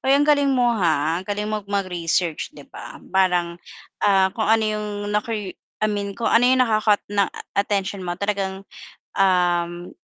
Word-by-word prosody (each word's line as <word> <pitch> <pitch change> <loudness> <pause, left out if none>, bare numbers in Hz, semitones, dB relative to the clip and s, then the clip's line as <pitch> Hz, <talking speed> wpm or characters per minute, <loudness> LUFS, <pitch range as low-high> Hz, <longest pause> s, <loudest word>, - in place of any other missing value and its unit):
Ay, 270 +1 +3
ang 290 - +3
galing 285 -1 +3
mo 250 -3 +2
ha, 165 -5 +1
ang 185 - -13
galing 205 0 -2
mong 210 -1 -4
mag-research 180 -4 -1
'di - - -11
ba. - - -9 0.2
Parang, 180 -2 +1 0.4
ah, 190 -2 +3
kung 220 -2 -2
ano 225 0 +4
'yong 215 0 -2 0.2
nacur 215 +2 -1 0.4
I 215 - +2
mean 200 -1 -3
kung 235 - -1
ano 235 +2 +4
'yong 260 0 +4
naka-caught 215 -2 +2
ng 200 -2 +2 0.2
attention 200 0 -1
mo 175 -1 -4
talagang, 195 -1 -3 0.5
um, 175 -2 +1
200 Hz, 165 wpm, -22 LUFS, 180-215 Hz, 0.5 s, ano